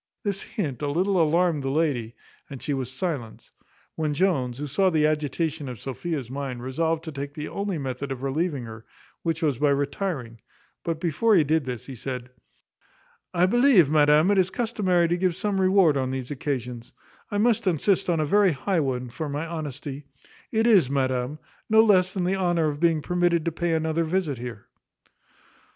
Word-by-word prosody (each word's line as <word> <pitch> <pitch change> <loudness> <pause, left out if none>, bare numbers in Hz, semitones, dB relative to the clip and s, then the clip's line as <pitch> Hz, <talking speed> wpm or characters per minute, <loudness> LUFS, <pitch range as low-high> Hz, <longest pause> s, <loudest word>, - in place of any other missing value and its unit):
This 200 -1 -2
hint 150 - -4
a 145 - -1
little 185 +4 +2
alarmed 165 0 +2
the 135 - -2
lady, 135 -6 0 0.3
and 135 - -7
she 145 - -2
was 130 -2 -3
silent; 135 -5 -5 0.4
when 155 -2 -2
Jones, 140 -9 +1
who 145 - -4
saw 185 +7 +2
the 155 -3 +2
agitation 155 0 -1
of 125 -4 -7
Sophia's 140 0 -4
mind, 130 -2 -5
resolved 160 +5 -1
to 160 - -6
take 140 0 -6
the 150 -1 -5
only 200 -3 -3
method 135 0 -4
of 135 0 -5
relieving 145 0 -1
her, 110 -1 -9 0.4
which 165 -1 -2
was 140 -6 +1
by 145 0 +3
retiring; 140 - -2 0.4
but, 165 -2 -2
before 175 +7 +2
he 170 - +5
did 155 0 +1
this, 125 -2 -5
he 135 - -8
said, 125 0 -6 1.0
"I 175 +1 +3
believe, 230 - +5
madam, 150 +4 +5
it 200 - +3
is 185 0 +2
customary 190 -7 +1
to 175 +1 0
give 180 -1 +1
some 195 +1 -1
reward 185 -6 +4
on 130 -1 -1
these 130 0 -4
occasions; 125 -4 -4 0.4
I 205 - -2
must 230 0 +2
insist 185 +3 +1
on 170 -2 +2
a 155 - +1
very 200 +2 +4
high 165 +7 0
one 125 -4 -2
for 155 +4 -4
my 145 +3 -3
honesty; 150 -3 -6 0.5
it 225 0 +2
is, 200 - +5
madam, 130 0 -1 0.3
no 220 0 +6
less 185 -4 +4
than 185 -2 -2
the 185 +2 +1
honour 175 -4 +1
of 145 -1 -5
being 165 -2 +2
permitted 175 -2 +1
to 170 - 0
pay 170 +1 -1
another 160 +1 0
visit 160 -6 -1
here." 120 -4 -7
155 Hz, 185 wpm, -25 LUFS, 135-180 Hz, 1.0 s, no